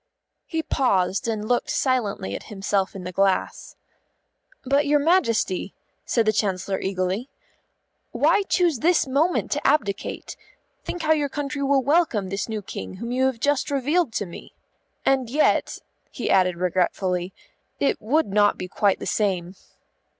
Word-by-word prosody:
He 325 -1 -2
paused 195 -10 +1
and 215 -2 -2
looked 245 +1 0
silently 230 - 0
at - - -6
himself 195 -1 -1
in 190 - -7
the 180 - -5
glass. 195 +1 0 0.9
"But, 280 +3 +2
your 295 +1 +4
Majesty," 255 - +1 0.3
said 230 -2 +1
the 215 - +3
Chancellor 195 -2 -1
eagerly, 190 +6 -2 0.8
"why - - +3
choose 345 -8 +2
this 345 +4 +3
moment 290 +7 +1
to - - 0
abdicate? 205 -9 -1 0.5
Think 350 - -5
how 315 - +2
your 295 -2 0
country 280 0 -4
will 275 -1 +2
welcome 280 - +2
this 195 +3 -3
new 215 -2 -4
King 95 - -7
whom 235 - -6
you 260 +1 +2
have 260 -3 -3
just 285 +2 +1
revealed 290 +2 +1
to 205 - -1
me. 170 - -11 0.5
And 265 -3 +2
yet," 295 +5 +2 0.3
he - - -3
added 185 -2 +3
regretfully, 180 0 0 0.5
"it 280 - +1
would 295 +9 +2
not 205 +1 +2
be 180 - -5
quite 200 +1 +1
the - - -7
same." 185 -4 -1
225 Hz, 150 wpm, -24 LUFS, 190-285 Hz, 0.9 s, your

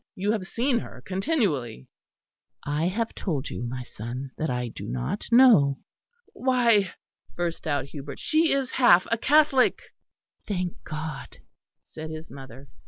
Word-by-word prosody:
You 200 +3 0
have 205 -4 -2
seen 240 +2 +1
her 130 - -9
continually." 185 - -1 0.8
"I 150 +3 0
have 225 +5 -2
told 150 -7 -3
you, - - -5
my 125 +1 -4
son, 125 +3 -7
that 160 - -2
I 125 -1 -2
do - - -8
not 60 +1 -3
know." 220 - +6 0.6
"Why," 235 -7 +2 0.4
burst 170 -2 -3
out 145 -3 0
Hubert, 140 0 -8
"she 320 +1 +2
is 270 -2 0
half 185 -9 +5
a 230 - +3
Catholic." 290 -1 +4 0.7
"Thank 180 -4 -2
God," 155 -2 -6 0.5
said 155 0 -8
his 155 +1 -8
mother. 135 0 -11
165 Hz, 140 wpm, -26 LUFS, -, 0.8 s, know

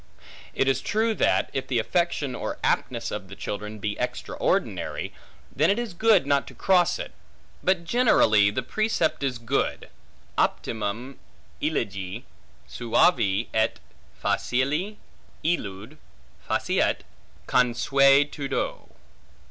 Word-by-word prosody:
It 135 - +1
is 135 - +2
true, 220 +1 +1
that - - +1
if 135 - -3
the 125 - 0
affection 145 +2 0
or - - -4
aptness - - 0
of - - -5
the - - -10
children 105 +1 -5
be 105 0 -3
extraordinary, - - -2 0.4
then 155 +5 +3
it 200 - +3
is 240 -5 -3
good 210 -3 +4
not 140 0 +1
to - - -11
cross 180 -3 +3
it; - - -6 0.5
but 185 -2 +1
generally 165 - +4
the 115 +5 -2
precept 215 - 0
is 135 -3 -1
good, 115 +4 -1 0.5
optimum 115 +5 -2 0.4
elige, 100 +2 -2 0.4
suave 115 - +2
et 110 0 +1 0.4
facile 150 +12 0 0.5
illud 110 - -2 0.5
faciet - - +1 0.4
consuetudo. 140 +3 +2
135 Hz, 110 wpm, -25 LUFS, 110-175 Hz, 0.5 s, good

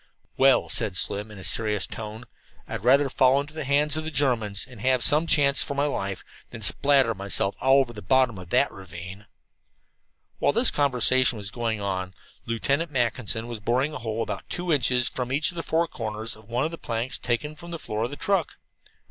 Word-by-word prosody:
"Well," 135 0 +4
said 95 -3 +1
Slim 105 +2 +1
in 105 - -12
a 95 - -10
serious 105 -1 +2
tone, 110 +1 -8 0.4
"I'd - - -6
rather 135 +4 +4
fall 130 0 +3
into 145 +1 -6
the 155 -2 -5
hands 145 +2 +2
of 155 - -2
the 160 - -4
Germans, 120 -9 0
and 120 -5 -13
have 130 0 +2
some 155 +4 +5
chance 145 -3 +4
for 140 - -2
my 140 - 0
life, 100 -10 -4 0.3
than 110 - -10
spatter 135 +2 +4
myself 100 0 -2
all 135 +1 +5
over 120 -3 -4
the 105 - -9
bottom 120 0 +1
of 90 -2 -11
that 130 +6 +2
ravine." 95 +3 -10 1.1
While - - +2
this 240 +1 +4
conversation 130 -3 +3
was 100 -1 -5
going 115 -4 -3
on, 95 -2 -4 0.3
Lieutenant 140 +8 -1
Mackinson 115 - -1
was 120 -2 -7
boring 125 +8 0
a - - -6
hole 115 0 -3
about - - -7
two 175 -1 -2
inches 125 -3 +2
in - - -21
from 125 -1 -4
each 145 +6 +1
of - - -15
the 165 - -3
four 165 +1 0
comers 110 -3 -5
of 110 0 -19
one 125 +5 -1
of 160 - -3
the 165 - -8
planks 115 +2 -2
taken 150 +6 -2
from 170 +3 -11
the 170 - -5
floor 110 -8 -5
of - - -5
the 145 - -7
truck. 190 0 -1
125 Hz, 210 wpm, -25 LUFS, 110-140 Hz, 1.1 s, some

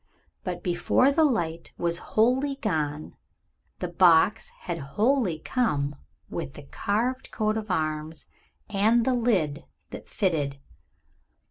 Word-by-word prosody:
But 180 -2 -4
before 180 +9 +3
the 320 +3 +3
light 170 - -1
was 170 0 -1 0.2
wholly 260 +5 +3
gone 155 - -2 0.6
the 180 - -3
box 175 +4 +4
had 170 -2 -4
wholly 205 - +1
come 150 - -1 0.3
with - - -5
the - - -10
carved 225 - -2
coat 215 -1 0
of 220 -1 -4
arms 155 -2 -2 0.4
and 220 +3 +3
the 260 - +2
lid 195 -12 +1 0.3
that - - -9
fitted. 150 -8 0
185 Hz, 120 wpm, -26 LUFS, 160-230 Hz, 0.6 s, box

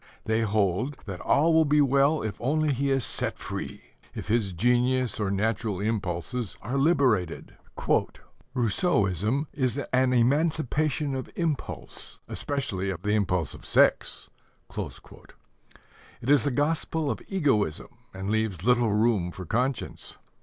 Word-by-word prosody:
They 110 +1 +1
hold 110 +5 0
that 95 -4 -6
all 160 +4 +3
will 160 0 +6
be 150 0 +3
well 140 +1 +3
if 110 -2 -5
only 150 +3 +1
he 140 +2 0
is 135 -3 +1
set - - -3
free - - -6 0.3
if - - -6
his 110 -3 +2
genius 125 +5 +1
or 105 -2 0
natural 105 0 -1
impulses 105 +1 -2
are 125 +6 -3
liberated. 130 - +1 1.0
"Rousseauism 110 - +1
is... 130 -3 0
an 130 -2 +1
emancipation 150 +2 +1
of 130 - -5
impulse 160 -5 -4
especially 100 -10 -2
of 90 -2 -5
the 105 - 0
impulse 90 -6 0
of - - -12
sex." - - +2 0.5
It 125 - -11
is 145 0 +4
a - - +4
gospel 150 +2 0
of - - -5
egoism 135 - 0 0.2
and 95 +2 -4
leaves 110 -6 -1
little 120 -2 +3
room 105 -5 +2
for 90 +1 -8
conscience. 125 - -2
120 Hz, 130 wpm, -27 LUFS, 100-140 Hz, 1.0 s, will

